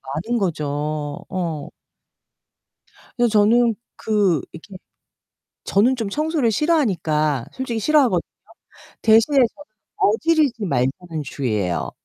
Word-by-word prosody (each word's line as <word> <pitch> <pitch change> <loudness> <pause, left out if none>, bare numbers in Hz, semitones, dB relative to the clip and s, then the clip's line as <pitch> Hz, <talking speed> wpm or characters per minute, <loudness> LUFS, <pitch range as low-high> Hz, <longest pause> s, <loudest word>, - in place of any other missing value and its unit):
많은 230 +9 -2
거죠. 155 -6 -2 0.6
어. 165 -6 -4 1.5
그래서 240 -1 +3
저는 225 +2 +4 0.2
그 200 -8 +1
이렇게 175 +4 -11 0.9
저는 235 +7 +2
좀 225 -5 -3
청소를 305 -2 0
싫어하니까 170 - +1
솔직히 245 -4 -3
싫어하거든요. 255 - +3 0.8
대신에 225 +6 +4
저는 250 -3 +6 0.5
어지르지 270 -1 +2
말자는 150 +3 -2
주의예요. 105 -10 -2
210 Hz, 250 characters per minute, -21 LUFS, 160-245 Hz, 1.5 s, 저는